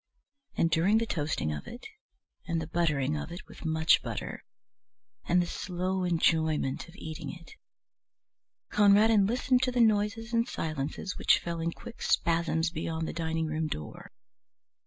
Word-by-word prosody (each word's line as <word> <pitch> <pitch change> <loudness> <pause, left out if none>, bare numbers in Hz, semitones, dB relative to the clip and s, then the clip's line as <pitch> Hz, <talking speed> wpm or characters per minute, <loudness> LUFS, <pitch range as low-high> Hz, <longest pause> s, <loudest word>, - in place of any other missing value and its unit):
And 165 - +2
during 180 +7 +4
the 230 - +1
toasting 145 - -1
of 75 - -7
it 240 - -9 0.6
and 170 -2 0
the 160 - -3
buttering 155 -4 0
of 150 +2 -5
it 175 +2 -8
with - - -13
much 160 0 +4
butter - - -5 0.8
and 175 +1 +3
the 175 - +2
slow 185 +2 -2
enjoyment 160 -3 +1
of 170 - -15
eating 155 0 -6
it, 170 -2 -13 1.2
Conradin 210 0 +5
listened 250 +2 +2
to 260 -1 +1
the 245 - -1
noises 220 +1 +2
and 230 0 +2
silences 155 +4 -4
which - - +5
fell 170 -1 -4
in 165 +1 -1
quick 235 +7 -11
spasms 165 0 +1
beyond 160 -1 -3
the - - -4
dining 160 0 -1
room 155 0 -1
door. 75 - -7
170 Hz, 155 wpm, -29 LUFS, 160-200 Hz, 1.2 s, Conradin